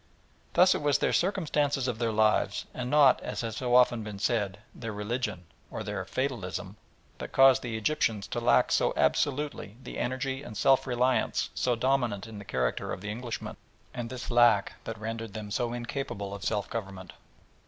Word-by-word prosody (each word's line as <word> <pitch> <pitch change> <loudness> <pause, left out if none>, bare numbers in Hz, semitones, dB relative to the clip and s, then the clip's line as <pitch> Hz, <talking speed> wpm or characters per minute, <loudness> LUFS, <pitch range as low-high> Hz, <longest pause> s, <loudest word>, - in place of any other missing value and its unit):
Thus 185 +1 +6
it - - -2
was 145 -1 +3
the - - 0
circumstances 150 -8 +1
of 120 -3 -2
their 115 -2 +1
lives, 110 0 +2
and 125 0 -4
not, 145 -2 +5
as - - -4
has 115 -2 -4
so 125 -1 +1
often 125 -2 +5
been 105 -2 -6
said, 100 -2 0 0.2
their 115 -2 -6
religion, 105 -3 -3 0.2
or - - -5
their - - -3
"fatalism," 100 -7 -3 0.4
that - - -6
caused 135 -3 +6
the 115 -3 -4
Egyptians 110 -4 0
to 120 - -2
lack 120 - +3
so - - +2
absolutely 140 -7 0
the - - -7
energy 130 +2 -2
and 110 -7 -8
self 135 0 +3
reliance 125 -1 +1
so 125 -1 +1
dominant 120 -5 0
in 110 -2 -9
the 100 - -10
character 65 -10 -1
of - - -5
the 105 +1 -4
Englishman, 120 +1 -5 0.4
and 120 -1 -5
this 125 -1 -6
lack 120 -4 +4
that 115 - -5
rendered 115 0 -5
them 105 -1 -6
so 120 +2 -1
incapable 120 -4 -4
of 100 -1 -7
self 105 -3 -1
government. 95 -6 -6
120 Hz, 180 wpm, -29 LUFS, 105-130 Hz, 0.4 s, Thus